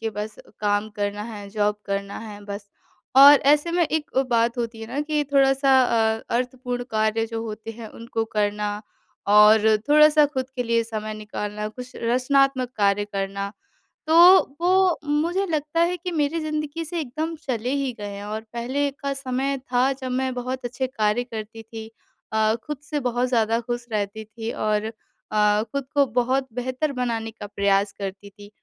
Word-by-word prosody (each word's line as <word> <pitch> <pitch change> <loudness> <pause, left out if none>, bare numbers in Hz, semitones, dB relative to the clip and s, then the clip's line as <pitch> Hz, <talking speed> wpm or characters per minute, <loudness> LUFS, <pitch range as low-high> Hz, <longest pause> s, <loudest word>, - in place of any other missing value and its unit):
के 225 0 -2
बस 210 +1 -5 0.3
काम 205 +1 +1
करना 205 0 -2
है। 210 -3 -8
जॉब 210 0 0
करना 200 0 -3
है 210 -2 -9
बस। 200 0 -7 0.5
और 280 +1 +10
ऐसे 300 +3 +1
में 350 - +2
एक 315 -1 -2
अ, 265 - +5
बात 235 -1 +1
होती 230 -1 -3
है 225 - -6
ना 265 +5 -3
कि 300 0 0
थोड़ा-सा 270 0 +4
अ, 225 -2 +1 0.2
अर्थपूर्ण 250 0 -3
कार्य 220 +1 +1
जो 225 0 -4
होते 220 0 -6
हैं 225 0 -9
उनको 230 0 -4
करना 210 0 0 0.6
और 210 +1 +6
थोड़ा-सा 300 0 +6
ख़ुद 260 -3 -4
के 245 - 0
लिए 230 -1 +1
समय 215 -1 -5
निकालना, 210 0 -5
कुछ 250 +3 -10
रचनात्मक 255 +2 +2
कार्य 205 0 +2
करना। 200 0 -4 0.6
तो 320 - +3 0.5
वो 370 0 +3
मुझे 325 +6 0
लगता 310 -2 -2
है 345 +1 +2
कि 360 +2 -5
मेरी 310 0 0
ज़िंदगी 305 0 -3
से 340 +2 -4
एकदम 315 +3 -3
चले 255 -6 -3
ही 265 - -1
गए 205 - -5
हैं 200 0 -7
और 215 +1 -4
पहले 260 +5 -1
का 280 -1 -2
समय 270 0 -2
था 255 +2 +3
जब 260 -1 -6
मैं 260 0 -1
बहुत 250 +1 -4
अच्छे 250 +2 -2
कार्य 225 -2 0
करती 225 -2 -8
थी। 220 0 -9 0.4
अ, 220 0 +2
ख़ुद 300 -1 -5
से 295 0 -3
बहुत 245 -1 0
ज़्यादा 230 -2 +2
ख़ुश 240 0 -4
रहती 210 0 -2
थी 225 +1 -6
और 215 +1 -1 0.4
अ, 210 0 +3
ख़ुद 265 +5 -4
को 285 -1 +4
बहुत 260 +2 +1
बेहतर 255 +5 -2
बनाने 230 -2 -2
का 215 -2 -9
प्रयास 200 0 +1
करती 200 +1 -6
थी 205 0 -15
235 Hz, 175 wpm, -23 LUFS, 215-275 Hz, 0.6 s, और